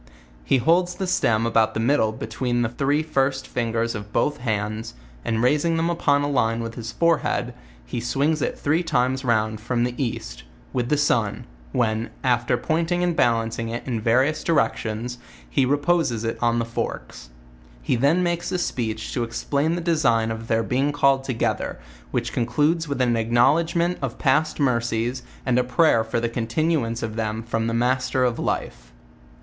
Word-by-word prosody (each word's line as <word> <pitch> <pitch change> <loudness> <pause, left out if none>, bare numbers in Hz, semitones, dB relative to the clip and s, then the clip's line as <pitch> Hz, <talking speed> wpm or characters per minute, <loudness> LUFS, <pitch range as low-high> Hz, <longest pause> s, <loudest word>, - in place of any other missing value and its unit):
He 135 - +3
holds 175 +7 +2
the 190 - -3
stem 115 -11 +2
about 115 -1 +2
the - - 0
middle 115 -2 +2
be 110 - -6
tween 120 +2 -1
the 115 - 0
three 140 +5 0
first 135 -3 0
fingers 115 -1 -1
of 105 -2 -7
both 145 +5 +1
hands, 110 - -3 0.3
and 115 +1 0
raising 150 +5 +2
them 165 +1 +1
upon 145 -4 +2
a - - 0
line 115 -5 +1
with 115 0 -5
his 115 -1 -6
forehead, 170 +1 +1 0.3
he - - -4
swings 140 +6 0
it - - -1
three 155 +4 +1
times 130 -5 0
round 110 -3 0
from 120 +1 0
the 125 0 -1
east, - - -5 0.3
with 125 -1 -1
the 150 - +2
sun, 115 -8 +1 0.3
when, 110 - 0
after 120 -1 +2
pointing 165 +6 0
and 175 -2 +1
balan 115 -4 +2
cing 115 0 -4
it 120 +1 -4
in 120 -4 -2
various 130 +7 +2
directions, 120 -5 -1 0.3
he - - +1
reposes 145 -4 +1
it 115 - -3
on 120 -1 +2
the 115 - 0
forks; 115 - -5 0.5
he 60 - +1
then 145 +9 +3
makes 175 -1 -1
a - - 0
speech 110 -10 -3
to 120 - 0
explain 140 +7 -1
the 175 - -3
design 120 -10 +2
of 115 0 -6
their 115 0 +1
being 135 +5 0
call 140 -2 +3
ed - - -12
together, 130 -4 -1 0.3
which - - -2
concludes 150 +8 +1
with 140 -3 -2
an 120 -2 +2
acknowledgment 155 +10 +2
of 135 -2 -3
past 150 +3 +1
mercies, 120 -2 0 0.2
and 125 -1 +2
a - - +2
prayer 125 -2 +3
for 110 +1 -2
the 115 - 0
continuance 115 +1 -1
of 110 -1 -4
them 110 0 -2
from 115 0 -1
the 115 - -1
Master 130 +2 +1
of 125 -2 0
Life. - - -3
125 Hz, 180 wpm, -23 LUFS, 115-145 Hz, 0.5 s, He